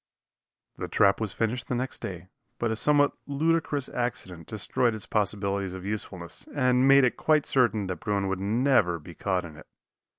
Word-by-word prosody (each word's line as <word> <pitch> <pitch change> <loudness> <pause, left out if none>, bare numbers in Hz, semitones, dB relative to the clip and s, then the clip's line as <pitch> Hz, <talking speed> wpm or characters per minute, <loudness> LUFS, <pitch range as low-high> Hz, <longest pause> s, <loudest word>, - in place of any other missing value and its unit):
The - - -3
trap 100 +1 +3
was 110 -3 -2
finished 115 +3 -2
the 125 - -1
next 130 +2 -3
day, 90 -1 -7 0.3
but 120 -1 -1
a - - 0
somewhat 145 +4 +4 0.2
ludicrous 150 -1 0
accident 95 -9 -4
destroyed 110 +2 0
its 110 - -5
possibilities 100 -2 -1
of 95 0 -8
usefulness, 100 -4 -5
and 125 -1 +3
made 135 0 +7
it 125 - +2
quite 155 -2 +2
certain 120 -6 +2
that 90 -2 -4
bruin 100 +1 -1
would 95 -1 -2
never 110 -3 +2
be 85 +2 -12
caught 95 0 -1
in 80 -2 -11
it. - - -14
110 Hz, 175 wpm, -27 LUFS, 95-125 Hz, 0.3 s, made